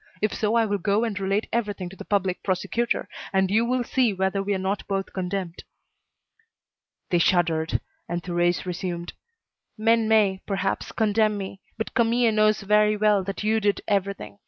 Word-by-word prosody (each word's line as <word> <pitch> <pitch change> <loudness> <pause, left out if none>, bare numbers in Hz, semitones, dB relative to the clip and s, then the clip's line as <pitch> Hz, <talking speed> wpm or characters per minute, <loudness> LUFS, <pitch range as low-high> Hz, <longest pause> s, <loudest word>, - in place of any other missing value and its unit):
If 215 0 0
so 215 +1 0
I 230 -1 +4
will 205 -1 -1
go 200 +5 +1
and 215 -4 -2
relate 195 +2 0
everything 205 -5 -1
to 190 - -12
the - - -9
Public 190 -3 0
Prosecutor, 230 +5 -1 0.2
and 190 -1 +2
you 220 +3 +3
will 250 +1 0
see 240 -3 +1
whether 190 +1 0
we 200 +1 -1
are - - 0
not 190 +2 -2
both 195 -1 -2
condemned." 185 -2 -4 1.5
They 175 - +3
shuddered, 165 -2 +2 0.3
and 175 0 -3
Thérèse 175 0 0
resumed: 175 -1 -4 0.6
"Men 225 +1 +3
may, 205 -4 +3
perhaps, 195 -1 -2
condemn 215 -1 +2
me, 195 0 -6 0.2
but 220 - -4
Camille 235 0 +3
knows 215 0 +3
very 210 +1 +3
well 210 -2 +3
that 195 +2 -4
you 220 +1 +2
did 205 -1 +1
everything. 195 - -2
200 Hz, 170 wpm, -25 LUFS, 190-215 Hz, 1.5 s, I